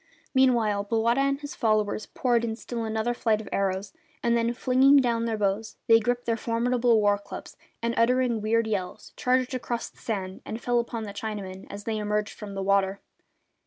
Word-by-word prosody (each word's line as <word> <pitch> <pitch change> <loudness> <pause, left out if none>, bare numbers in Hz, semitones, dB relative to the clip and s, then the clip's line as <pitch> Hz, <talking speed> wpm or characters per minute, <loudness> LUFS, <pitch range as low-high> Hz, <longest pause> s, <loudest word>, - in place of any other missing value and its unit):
Meanwhile 235 -6 +3
Bowata 230 +3 +2
and 275 0 +1
his 290 0 -7
followers 215 -1 0
poured 240 -2 +1
in 225 -1 -2
still 235 0 -5
another 220 +2 -1
flight 225 -3 +1
of 215 - -8
arrows, 195 0 -1 0.3
and 235 0 +3
then, 235 0 +1
flinging 260 +3 +4
down 235 -3 +2
their 225 -1 -1
bows, 205 +2 -1
they 225 0 +6
gripped 245 +2 -1
their 230 - +1
formidable 235 +1 +2
war 205 -1 +3
clubs 200 0 -9 0.3
and, 235 0 +1
uttering 240 -1 +2
weird 230 +2 +2
yells, 195 -4 -4
charged 255 +1 +1
across 240 -2 -3
the - - -30
sand 190 -4 -4
and 220 - -5
fell 245 0 +1
upon 235 -1 -3
the 205 -2 -6
Chinamen 200 -3 -6
as 205 +1 -7
they 220 0 -2
emerged 210 0 -1
from 205 -2 -8
the 195 - -2
water. 195 0 +2
225 Hz, 190 wpm, -26 LUFS, 205-240 Hz, 0.3 s, they